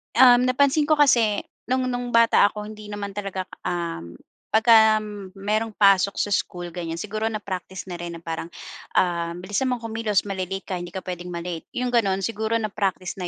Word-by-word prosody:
Um, 250 0 +7
napansin 280 +3 +3
ko 310 - +4
kasi 235 -8 +3 0.2
nung 255 +1 +1
nung 245 0 -4
bata 230 -3 +6
ako, 210 0 -6
hindi 215 -1 -10
naman 205 -1 -5
talaga 195 -2 -4
k - - -33 0.2
um, 165 - -4 0.3
pagka 220 -1 +5 0.3
merong 210 +2 -1
pasok 195 -1 +4
sa 205 - -1
school, 175 -3 -2
ganyan, 165 -1 -5
siguro 215 +5 -3
na-practice 190 -4 -5
na 175 -2 -7
rin 170 0 -6
na 165 - -10
parang, 165 0 -4 0.5
ah, 170 -1 +1
"Bilisan 205 +9 -2
mong 250 -2 -2
kumilos, 220 -4 0
mali-late 195 -1 -4
ka, 185 -2 -4
hindi 175 0 -6
ka 190 - -4
pwedeng 180 -1 -6
ma-late." 170 -1 -5
yong 250 0 -1
gano'n. 195 -5 +1
Siguro 220 +1 -1
na-practice 195 -4 -2
na 180 - -3
205 Hz, 180 wpm, -24 LUFS, 180-225 Hz, 0.5 s, Um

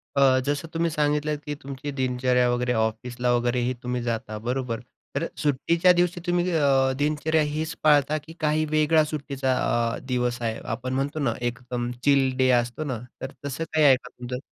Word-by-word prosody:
अ, 135 -2 +5
जसं 145 +2 -1
तुम्ही 165 0 +1
सांगितलं, 150 0 +1
की 145 0 -3
तुमची 140 +1 -6
दिनचर्या 125 -1 +2
वगैरे 125 0 0
ऑफिसला 120 +2 -1
वगैरेही 120 +1 +1
तुम्ही 125 0 -2
जाता 110 -2 -3
बरोबर. 125 -3 -1 0.4
तर - - 0
सुट्टीच्या 165 +5 +3
दिवशी 175 0 +1
तुम्ही 175 +1 +1
अ, 135 -4 +3
दिनचर्या 155 +2 +1
हीच 155 +2 -2
पाळता 150 0 +4
की 155 +2 -10
काही 155 0 +1
वेगळा 155 +1 +4
सुट्टीचा 140 -3 -2 0.4
अ, - - -6
दिवस 125 -1 -1
आहे? 115 -1 -2
आपण 130 +3 -3
म्हणतो 140 +3 -1
ना 120 -6 +1
एकदम 120 0 -3
चिल 140 -2 +4
डे 130 0 +3
असतो 120 +5 -4
ना. 130 -6 -3 0.2
तर 130 - -5
तसं 145 +4 -3
काही 155 -1 +4
आहे 135 -2 +8
का 125 0 -10
तुझं? 125 0 -6
135 Hz, 175 wpm, -25 LUFS, 125-150 Hz, 0.4 s, आहे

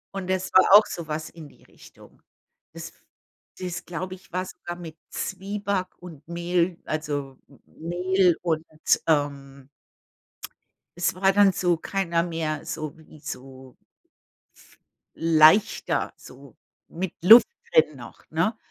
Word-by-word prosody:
Und 185 -1 -5
das 185 0 -1
war 185 - +7
auch 210 - +4
so 170 -3 -7
was 155 0 -4
in 160 -3 -12
die - - -23
Richtung. - - -19 0.5
Das - - -8 0.7
das, 180 -2 -5
glaube 185 +2 -5
ich, 190 - -21
war 185 +1 -1
sogar 175 -1 -8
mit 165 -2 -10
Zwieback 200 0 -3
und 160 -5 -12
Mehl, 170 +1 -1
also 145 -3 -4 0.3
Mehl 180 +2 0
und, 160 -2 -1 0.4
ähm 140 -3 -1 1.3
es 175 -1 0
war 190 +1 +3
dann 200 -1 +5
so 175 -2 +1
keiner 170 -1 -1
mehr 165 -3 -3
so 155 -1 -6
wie 155 -1 -17
so 130 -2 -10 1.4
leichter, 165 +5 +3
so - - -15 0.3
mit 180 +1 -5
Luft 225 +6 +9 0.3
drin 475 - +4
noch, - - -12
ne? - - 0
170 Hz, 125 wpm, -25 LUFS, 155-185 Hz, 1.4 s, Luft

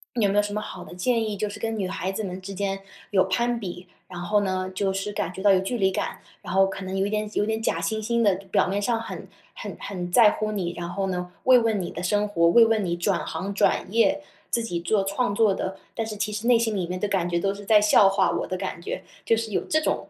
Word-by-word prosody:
有 220 -4 +3
没 195 - -1
有 - - +6
什 205 0 -4
么 210 - -2
好 185 -4 -7
的 - - -11
建 230 +6 +1
议， 210 -2 -3
就 210 +2 -1
是 205 - -8
跟 225 -1 -2
女 190 - -1
孩 185 +1 -3
子 205 +2 -3
们 185 0 -6
之 195 +1 -7
间 195 0 -2 0.3
有 190 -2 +4
攀 235 +6 0
比， 180 -4 -7 0.2
然 180 -2 -7
后 205 +4 +2
呢， 185 -1 -1
就 195 0 0
是 195 +2 -3
感 180 -3 -2
觉 190 - -7
到 200 0 +5
有 190 - +4
距 215 +6 -2
离 190 -3 +3
感， 190 - -3 0.2
然 - - -6
后 195 0 +5
可 195 0 -6
能 190 +1 -4
有 195 - +1
一 - - -1
点 215 0 -1
有 205 - +1
点 220 +1 -1
假 - - 0
惺 - - -1
惺 235 +1 +1
的， 205 -4 +4 0.2
表 - - +3
面 200 +2 -1
上 230 +2 +1
很 230 - -7 0.3
很 - - -7
很 180 -3 -5
在 220 +2 +7
乎 215 0 -2
你， 180 -5 -2
然 175 0 -4
后 195 +2 -2
呢， 180 -1 -3
慰 255 -1 +8
问 225 -4 +1
你 175 - -4
的 - - -6
生 205 +3 +1
活， 170 -5 +3
慰 230 +6 +7
问 225 -2 +2
你 175 -2 -1
转 175 - 0
行、 200 +2 -4
转 195 - +2
业， 285 +6 +3 0.3
自 235 - +1
己 175 -7 -3
做 200 +4 +1
创 200 +3 0
作 210 -1 +3
的 190 0 -4 0.2
但 225 - -1
是 215 -1 -6
其 210 +1 -2
实 210 +2 -4
内 240 -1 +5
心 225 -2 0
里 185 -3 -1
面 180 +1 -4
的 210 - 0
感 190 -3 0
觉 170 0 +1
都 195 +3 0
是 205 +1 -10
在 210 +1 +5
笑 210 -1 +6
话 195 -1 +2
我 - - -1
的 185 - -3
感 185 -2 -5
觉， - - -4 0.2
就 225 - +2
是 225 -2 -4
有 - - +1
这 310 - +1
种 315 - -2
200 Hz, 305 characters per minute, -25 LUFS, 185-220 Hz, 0.3 s, 慰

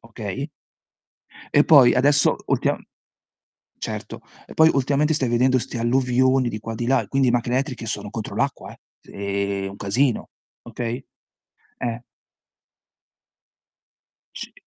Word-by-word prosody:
okay 115 - -6 1.1
e 145 - +6
poi 135 -6 +7
adesso 140 +3 +3
ultimam - - 0 1.0
certo, - - -6 0.3
e - - -11
poi 160 0 +6
ultimamente 140 +3 +1
stai 135 -5 0
vedendo 130 +2 +3
'ste 120 - -6
alluvioni 130 +1 +2
di 110 - -5
qua 115 +1 -6
e - - -6
di 120 +1 -3
là, 135 0 +2
quindi 135 -2 +2
macchine 120 +1 0
elettriche 130 -3 -2
sono 105 -2 -4
contro 110 -1 -6
l'acqua, - - -2
eh. - - -20 0.2
Se 100 0 -3
un 100 - -10
casino, 120 +5 0 0.3
okay? 120 +2 -5 0.7
Eh. 120 0 -3 2.3
Sì. - - -8
125 Hz, 125 wpm, -22 LUFS, 115-135 Hz, 2.3 s, poi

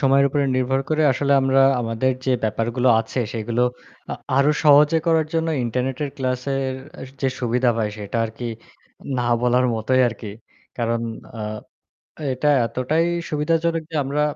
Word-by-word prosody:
সময়ের 140 0 +4
উপরে 145 +1 0
নির্ভর 130 +1 +1
করে 155 0 +2
আসলে 140 +2 0
আমরা 135 0 +3 0.2
আমাদের 115 +3 0
যে 130 - +3
ব্যাপারগুলো 120 +3 0
আছে 125 - -4
সেগুলো 115 +2 -1 0.5
আ - - -2 0.2
আরও 140 +2 +4
সহজে 150 +2 +6
করার 160 -2 +3
জন্য 165 0 +1 0.2
ইন্টারনেটের 130 +4 -2
ক্লাসের 130 0 -2 0.2
অ্যা - - -10 0.2
যে 135 - +1
সুবিধা 125 0 +2
ভাই, 110 -1 0
সেটা 105 +2 -5
আরকি 115 +2 -7 0.7
না - - 0 0.2
বলার 125 +1 +3
মতোই 120 +4 +1
আরকি। 110 -2 -8 0.5
কারণ 115 0 0 0.4
আ - - -5 0.9
এটা 130 +4 0 0.2
এতটাই 130 +8 0 0.2
সুবিধাজনক 165 +2 0
যে - - -6
আমরা 140 +2 -1
130 Hz, 145 wpm, -22 LUFS, 120-145 Hz, 0.9 s, সহজে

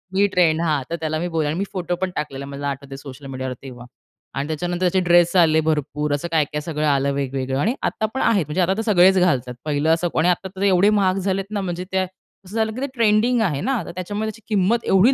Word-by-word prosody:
ही 200 - +4
trend, 165 -3 +3
हां, 155 -4 +1
तर 170 - -1
त्याला 155 0 -2
मी 175 - -2
बोलले 160 -3 -1
आणि 160 - -2
मी 195 - 0
फोटो 180 -1 -2
पण 190 - 0
टाकलेला, 140 -2 -4
मला 140 0 -5
आठवत 140 0 -7
सोशल 135 0 -11
मीडियावर 130 -1 -4
तेव्हा. 125 -3 -10 0.5
आणि 140 +1 -3
त्याच्यानंतर 175 +3 -3
त्याचे 185 - +1
ड्रेस 175 +1 +4
आले 160 -3 +5
भरपूर, 150 -1 -1
असं 145 +4 -2
काय-काय 150 -1 0
सगळं 155 -1 -2
आलं 140 -1 +2
वेगवेगळं 135 -1 -2
आणि 225 - +1
आता 220 - -1
पण 265 - -2
आहेत, 200 -9 +2
म्हणजे 150 +5 -1
आता 180 +2 +2
तर - - 0
सगळेच 190 +1 +6
घालतात 130 -9 +1
पहिलं 150 +1 0
असं 175 +1 0
आणि 170 - +3
आता 180 +2 0
तर 190 - -7
एवढे 195 0 +4
महाग 195 -3 +2
झालेत 190 0 -1
ना, 205 - -1
म्हणजे 180 -1 -4
त्या 190 0 +1 0.4
असं 200 +5 -10
झालं 220 -1 +1
की 255 - -6
ते 280 - -1
ट्रेंडिंग 230 +1 +3
आहे 150 -9 0
ना, 255 -5 0
तर - - -7
त्याच्यामुळे 205 +4 -3
त्याची 225 +1 -10
किंमत 215 +2 +1
एवढी 200 +8 +5
175 Hz, 240 wpm, -21 LUFS, 145-195 Hz, 0.5 s, सगळेच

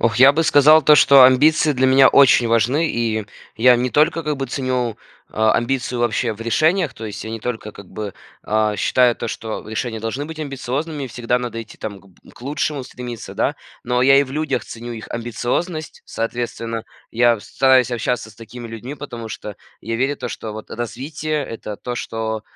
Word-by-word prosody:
Ох, 115 -1 +1
я 135 +3 +7
бы 165 +2 +1
сказал 155 +1 +6
то, 150 - +7
что 140 -2 +7
амбиции 150 +4 +4
для 130 -1 +2
меня 135 0 +6
очень 130 -3 +5
важны, 120 +8 +2
и 110 -3 -1 0.3
я 125 +3 +6
не 125 +1 -1
только, 160 +4 +2
как 150 -1 -2
бы, 135 0 -3
ценю, 125 -3 -2 0.3
а, 110 0 +2
амбиции 125 0 -1
вообще 120 0 0
в 105 - -12
решениях, 155 +8 +1
то 115 - -9
есть 105 -1 -6
я 110 - -6
не 115 0 -5
только, 110 -2 -5
как 100 - -12
бы, 105 -2 -6 0.3
а, 110 -1 +1
считаю 125 +4 +3
то, - - -4
что 110 0 -6
решения 110 +1 -3
должны 115 +6 -3
быть 160 +1 -9
амбициозными, 140 0 -4
всегда 120 +1 -1
надо 120 -2 -5
идти, 110 - -12
там, 100 -3 -6
к 100 - -22
б 95 - -21
к - - -17
лучшему 145 0 -2
стремиться, 125 -2 -8
да. - - 0 0.3
Но 125 +1 0
я 135 +1 +6
и 140 - +5
в 130 - -7
людях 150 0 -2
ценю 120 +1 -8
их 110 -1 -8
амбициозность, 125 +8 -3
соответственно, 115 -1 -4 0.3
я 120 -1 +3
с - - -14
стараюсь 130 -2 +4
общаться 120 -1 -2
с - - -18
такими 115 +1 -10
людьми, 115 +5 -7
потому 120 -6 -8
что 105 -2 -7 0.2
я 115 +2 -3
верю 135 +4 0
то, - - -5
что, 110 - -6
вот, 110 0 -9
развитие- 145 +5 -4
это 105 -2 -7
то, 125 +3 -5
что 110 -2 -4
120 Hz, 200 wpm, -20 LUFS, 115-140 Hz, 0.3 s, я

